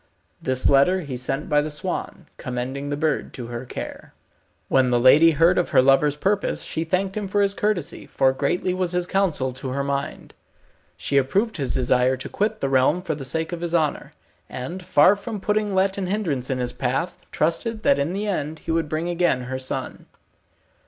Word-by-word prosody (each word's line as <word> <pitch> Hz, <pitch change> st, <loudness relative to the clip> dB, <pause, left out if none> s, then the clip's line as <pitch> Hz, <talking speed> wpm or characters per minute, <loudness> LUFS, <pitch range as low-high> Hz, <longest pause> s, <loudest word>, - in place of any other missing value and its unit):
This 130 Hz, 0 st, +1 dB
letter 145 Hz, +7 st, +4 dB
he 140 Hz, -6 st, -6 dB
sent 130 Hz, +3 st, -3 dB
by 150 Hz, 0 st, +3 dB
the 150 Hz, -, -3 dB
swan, 175 Hz, +5 st, -4 dB
commending 130 Hz, +1 st, -4 dB
the 145 Hz, -, -2 dB
bird 155 Hz, +1 st, -1 dB
to 125 Hz, -, -6 dB
her 120 Hz, +2 st, -5 dB
care. -, -, -8 dB, 0.5 s
When 130 Hz, -1 st, +3 dB
the 120 Hz, -1 st, +2 dB
lady 145 Hz, +7 st, +7 dB
heard 165 Hz, +4 st, +4 dB
of 175 Hz, -, -1 dB
her -, -, +5 dB
lover's 140 Hz, +2 st, +4 dB
purpose, 200 Hz, +6 st, 0 dB
she 160 Hz, -, -2 dB
thanked 185 Hz, +3 st, -1 dB
him 210 Hz, -2 st, -3 dB
for 205 Hz, +2 st, 0 dB
his 200 Hz, -1 st, +2 dB
courtesy, 205 Hz, -6 st, -2 dB
for 135 Hz, -1 st, +2 dB
greatly 175 Hz, +7 st, 0 dB
was 185 Hz, -1 st, -1 dB
his 180 Hz, 0 st, 0 dB
counsel 170 Hz, -10 st, 0 dB
to 130 Hz, +1 st, -6 dB
her 140 Hz, +2 st, -2 dB
mind. 140 Hz, 0 st, -4 dB, 0.6 s
She 140 Hz, -, -1 dB
approved 195 Hz, -, +1 dB
his 135 Hz, -4 st, -1 dB
desire 125 Hz, 0 st, +2 dB
to 130 Hz, -, -7 dB
quit 215 Hz, +1 st, -1 dB
the 135 Hz, -, +1 dB
realm 135 Hz, +7 st, +2 dB
for 165 Hz, -4 st, -2 dB
the 145 Hz, -2 st, -6 dB
sake 160 Hz, +5 st, -2 dB
of 175 Hz, -1 st, -5 dB
his 175 Hz, 0 st, -1 dB
honour, 155 Hz, -3 st, -1 dB, 0.4 s
and 170 Hz, +9 st, -6 dB
far 175 Hz, +4 st, +5 dB
from 210 Hz, +1 st, -6 dB
putting 210 Hz, 0 st, 0 dB
let 195 Hz, +1 st, +1 dB
and 185 Hz, -2 st, -3 dB
hindrance 165 Hz, -12 st, -2 dB
in 130 Hz, -, 0 dB
his 125 Hz, -1 st, -2 dB
path, 135 Hz, +7 st, -2 dB
trusted 215 Hz, +8 st, -1 dB
that 280 Hz, -, +4 dB
in 155 Hz, +5 st, -1 dB
the 205 Hz, +2 st, -2 dB
end 160 Hz, -6 st, -2 dB
he 160 Hz, -, -5 dB
would 165 Hz, -2 st, 0 dB
bring 155 Hz, +3 st, -2 dB
again 175 Hz, -6 st, +1 dB
her 130 Hz, +1 st, -4 dB
son. 130 Hz, -, -5 dB
155 Hz, 200 wpm, -23 LUFS, 135-185 Hz, 0.6 s, lady